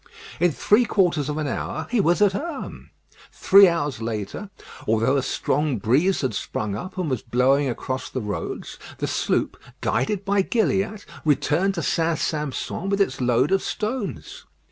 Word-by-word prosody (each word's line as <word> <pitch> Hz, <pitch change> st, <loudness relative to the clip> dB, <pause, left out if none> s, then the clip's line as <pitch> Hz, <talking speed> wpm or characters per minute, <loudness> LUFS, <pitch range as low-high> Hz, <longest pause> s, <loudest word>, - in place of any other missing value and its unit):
In 175 Hz, -1 st, +3 dB
three 210 Hz, -, +3 dB
quarters 175 Hz, -, +1 dB
of 150 Hz, -, -2 dB
an 155 Hz, -, -1 dB
hour 155 Hz, +3 st, -3 dB
he 240 Hz, -4 st, +3 dB
was 175 Hz, +3 st, +3 dB
at 205 Hz, -, +5 dB
Herm. 290 Hz, -, -6 dB, 0.4 s
Three 195 Hz, 0 st, +7 dB
hours 145 Hz, -8 st, -1 dB
later, 110 Hz, -, -4 dB, 0.4 s
although 115 Hz, +5 st, +2 dB
a 140 Hz, -, +2 dB
strong 145 Hz, +1 st, 0 dB
breeze 140 Hz, -, +2 dB
had 130 Hz, -5 st, -1 dB
sprung 100 Hz, +1 st, -3 dB
up 185 Hz, -, -7 dB
and 180 Hz, -3 st, -1 dB
was 130 Hz, -6 st, -1 dB
blowing 130 Hz, +4 st, +2 dB
across 130 Hz, +2 st, -4 dB
the 130 Hz, -, -3 dB
roads, 105 Hz, -3 st, -5 dB, 0.2 s
the -, -, -2 dB
sloop, -, -, -1 dB, 0.2 s
guided 195 Hz, +10 st, 0 dB
by 200 Hz, 0 st, +3 dB
Gilliatt, 205 Hz, -1 st, 0 dB, 0.2 s
returned 155 Hz, +6 st, +2 dB
to 170 Hz, -, -2 dB
St. 165 Hz, -1 st, +1 dB
Sampson 150 Hz, +4 st, -3 dB
with 200 Hz, 0 st, 0 dB
its 165 Hz, -10 st, 0 dB
load 125 Hz, +5 st, +2 dB
of 195 Hz, -, +3 dB
stones. 215 Hz, +1 st, -4 dB
155 Hz, 165 wpm, -23 LUFS, 130-195 Hz, 0.4 s, Three